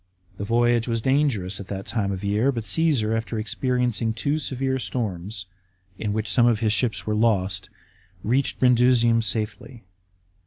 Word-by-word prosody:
The -, -, -4 dB
voyage 120 Hz, +2 st, +2 dB
was 115 Hz, -1 st, 0 dB
dangerous 120 Hz, -8 st, 0 dB
at 100 Hz, -, -8 dB
that 100 Hz, -1 st, -6 dB
season 105 Hz, -4 st, -1 dB
of 95 Hz, -1 st, -4 dB
the 100 Hz, -, -2 dB
year, 110 Hz, +7 st, +2 dB
but 115 Hz, -4 st, -4 dB
Cassar, 125 Hz, -6 st, +2 dB
after 115 Hz, 0 st, -3 dB
experiencing 115 Hz, +1 st, -1 dB
two 145 Hz, +7 st, -1 dB
severe 130 Hz, -2 st, -1 dB
storms, 100 Hz, -6 st, -3 dB, 0.5 s
in 105 Hz, -, -2 dB
which 110 Hz, +1 st, -2 dB
some 120 Hz, -1 st, +3 dB
of 115 Hz, -3 st, +2 dB
his 110 Hz, -2 st, +1 dB
ships 110 Hz, -6 st, 0 dB
were 105 Hz, -, -1 dB
lost, 100 Hz, -4 st, +1 dB, 0.5 s
reached 130 Hz, +6 st, 0 dB
Brundusium 120 Hz, -2 st, +4 dB
safely. 115 Hz, +2 st, -3 dB
115 Hz, 160 wpm, -24 LUFS, 105-125 Hz, 0.5 s, Brundusium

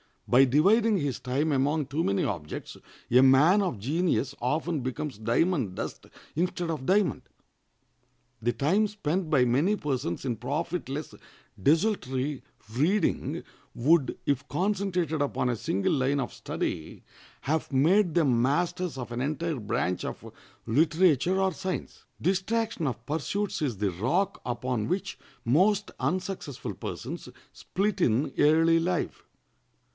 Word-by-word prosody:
By 130 Hz, +3 st, +6 dB
dividing 205 Hz, -, +4 dB
his 145 Hz, -7 st, -2 dB
time 140 Hz, +5 st, 0 dB
among 145 Hz, +2 st, +1 dB
too 150 Hz, +4 st, -1 dB
many 100 Hz, -, +1 dB
objects, 80 Hz, -6 st, -5 dB, 0.3 s
a 125 Hz, +2 st, +7 dB
man 145 Hz, +10 st, +6 dB
of 180 Hz, -, -1 dB
genius 140 Hz, -, 0 dB
often 155 Hz, +5 st, 0 dB
becomes 130 Hz, +1 st, -4 dB
diamond 115 Hz, -, +1 dB
dust -, -, -6 dB, 0.3 s
instead 175 Hz, 0 st, -1 dB
of 145 Hz, -5 st, -4 dB
diamond. 190 Hz, -4 st, +2 dB, 1.2 s
The 120 Hz, +2 st, +1 dB
time 195 Hz, +10 st, +2 dB
spent 185 Hz, -4 st, -2 dB
by 140 Hz, -5 st, +4 dB
many 145 Hz, -, +2 dB
persons 130 Hz, -, -3 dB
in 120 Hz, -4 st, -1 dB
profitless, 145 Hz, +4 st, -3 dB, 0.5 s
desultory 145 Hz, -, +1 dB, 0.3 s
reading 170 Hz, -, +1 dB, 0.3 s
would, 145 Hz, +2 st, +3 dB
if 140 Hz, 0 st, 0 dB
concentrated 185 Hz, -5 st, -1 dB
upon 135 Hz, -3 st, 0 dB
a 120 Hz, -, 0 dB
single 100 Hz, -2 st, 0 dB
line 140 Hz, 0 st, +1 dB
of 120 Hz, -, -4 dB
study, 80 Hz, -, -4 dB, 0.4 s
have 155 Hz, +2 st, -1 dB
made 170 Hz, +7 st, +3 dB
them 135 Hz, -9 st, +3 dB
masters 165 Hz, +4 st, 0 dB
of 125 Hz, -2 st, -6 dB
an 120 Hz, -, -3 dB
entire 155 Hz, +1 st, -2 dB
branch 90 Hz, -4 st, -1 dB
of -, -, -7 dB, 0.3 s
literature 160 Hz, +6 st, +3 dB
or 190 Hz, 0 st, +2 dB
science. 185 Hz, +2 st, -5 dB, 0.2 s
Distraction 195 Hz, -1 st, 0 dB
of 120 Hz, -2 st, -4 dB
pursuits 165 Hz, +7 st, -2 dB
is 130 Hz, -9 st, -1 dB
the 100 Hz, -1 st, 0 dB
rock 140 Hz, -, 0 dB
upon 120 Hz, -2 st, -2 dB
which 195 Hz, +3 st, -3 dB, 0.3 s
most 190 Hz, -, +3 dB
unsuccessful 180 Hz, -1 st, -3 dB
persons -, -, -6 dB, 0.2 s
split 200 Hz, +1 st, -2 dB
in 125 Hz, +1 st, +2 dB
early 165 Hz, +2 st, +5 dB
life. 175 Hz, 0 st, -2 dB
150 Hz, 130 wpm, -28 LUFS, 130-180 Hz, 1.2 s, a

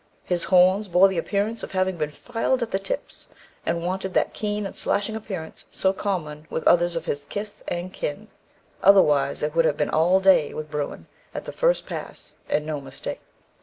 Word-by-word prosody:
His 175 Hz, -2 st, 0 dB
horns 185 Hz, +3 st, +4 dB
bore 180 Hz, +2 st, +6 dB
the 190 Hz, -3 st, -1 dB
appearance 205 Hz, +5 st, -1 dB
of -, -, -7 dB
having 185 Hz, 0 st, +1 dB
been 155 Hz, -3 st, -2 dB
filed 235 Hz, -, -1 dB
at 225 Hz, -, -5 dB
the 195 Hz, -, +1 dB
tips, 195 Hz, -, -5 dB, 0.4 s
and 170 Hz, 0 st, 0 dB
wanted 190 Hz, +1 st, -3 dB
that -, -, +2 dB
keen 210 Hz, -1 st, -2 dB
and 195 Hz, -, -6 dB
slashing 210 Hz, +2 st, 0 dB
appearance 190 Hz, -7 st, -6 dB
so 190 Hz, 0 st, +1 dB
common 155 Hz, -7 st, -3 dB
with 160 Hz, -, -2 dB
others 175 Hz, 0 st, +4 dB
of 165 Hz, -1 st, -3 dB
his 145 Hz, 0 st, -3 dB
kith 205 Hz, 0 st, -6 dB
and 175 Hz, +2 st, -4 dB
kin; 145 Hz, -, -4 dB, 0.5 s
otherwise 150 Hz, -10 st, +5 dB
it 150 Hz, 0 st, -1 dB
would 165 Hz, 0 st, +3 dB
have 150 Hz, -2 st, +1 dB
been 150 Hz, -, 0 dB
'all 175 Hz, +4 st, +4 dB
day' 190 Hz, -6 st, +4 dB
with 155 Hz, 0 st, -6 dB
Bruin 150 Hz, -1 st, -4 dB, 0.3 s
at -, -, -5 dB
the -, -, -5 dB
first -, -, +1 dB
pass, -, -, -7 dB, 0.2 s
and 150 Hz, -, +1 dB
no 155 Hz, -2 st, -3 dB
mistake. 135 Hz, -1 st, -6 dB
180 Hz, 195 wpm, -24 LUFS, 155-195 Hz, 0.5 s, bore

